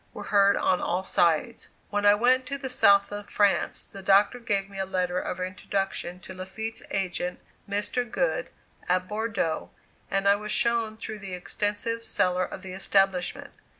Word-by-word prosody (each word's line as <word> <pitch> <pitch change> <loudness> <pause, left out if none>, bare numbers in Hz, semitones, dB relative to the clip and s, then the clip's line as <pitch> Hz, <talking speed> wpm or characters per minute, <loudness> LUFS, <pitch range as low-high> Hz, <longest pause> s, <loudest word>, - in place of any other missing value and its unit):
were - - -6
heard 200 0 +5
on 180 - +2
all 180 +2 -1
sides. 175 +6 +1 0.2
When 205 0 +2
I 205 - +7
went 255 +4 +3
to 280 +1 -2
the 265 -2 -5
south 200 -5 +5
of 205 0 -7
France, 205 -2 +1
the 195 - -11
Doctor 200 +5 +4
gave 200 -4 -1
me 195 -1 -9
a - - +1
letter 180 -1 0
of 185 - -4
introduction 185 -1 -3
to 185 - -9
Lafitte's 205 +5 -6
agent, 180 -2 -2 0.3
Mr. 205 +4 -1
Good, - - -1 0.4
at 185 0 +2
Bordeaux, 210 -6 -2 0.4
and 195 0 0
I 200 0 +6
was 210 +1 -5
shown 230 -2 +1
through 220 -1 -6
the 195 -2 -6
extensive 205 +5 -2
cellar 180 -4 +1
of 190 - -9
the 185 -1 -7
establishment. 195 -1 +1
200 Hz, 170 wpm, -27 LUFS, 185-220 Hz, 0.4 s, I